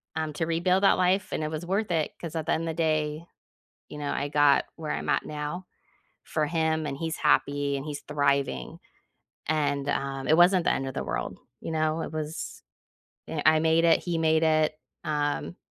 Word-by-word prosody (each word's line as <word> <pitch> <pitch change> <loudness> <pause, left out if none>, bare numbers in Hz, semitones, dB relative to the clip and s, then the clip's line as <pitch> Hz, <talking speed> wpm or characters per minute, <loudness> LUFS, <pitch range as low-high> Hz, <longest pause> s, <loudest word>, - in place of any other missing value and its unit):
um, 155 -1 -2
to 165 - -1
rebuild 180 +4 +1
that 195 - +5
life, 185 +2 +2
and - - -2
it 155 - -2
was 155 +2 -4
worth 195 +3 -1
it, 160 -3 0
'cause 165 -1 -6
at 160 - -3
the - - +1
end 160 - -1
of - - -3
the 160 - -2
day, 155 0 0 0.6
you - - -9
know, 145 -1 -3
I 140 - -2
got 145 -1 +4
where 160 -2 -4
I'm - - -4
at 140 - +2
now, 150 +4 -5 0.6
for 155 - -1
him, 160 -1 0
and 140 -2 -4
he's 160 +1 -3
happy, 145 -2 +2
and 135 - -6
he's 145 -1 -5
thriving, 140 - -1 0.7
and, 145 -2 0
um, 135 -1 -2
it 155 +4 +4
wasn't 175 0 +5
the - - +4
end 135 - -1
of 130 - -5
the - - -3
world, - - -3 0.2
you - - -5
know? 155 0 0
It - - -5
was 155 0 -5 0.7
eh 160 -2 -3
I 155 0 +6
made 160 +1 +3
it, 165 - +5
he 175 -2 -1
made 160 0 +3
it, 155 -1 +3 0.3
um 150 +2 -1
155 Hz, 205 wpm, -27 LUFS, 145-165 Hz, 0.7 s, I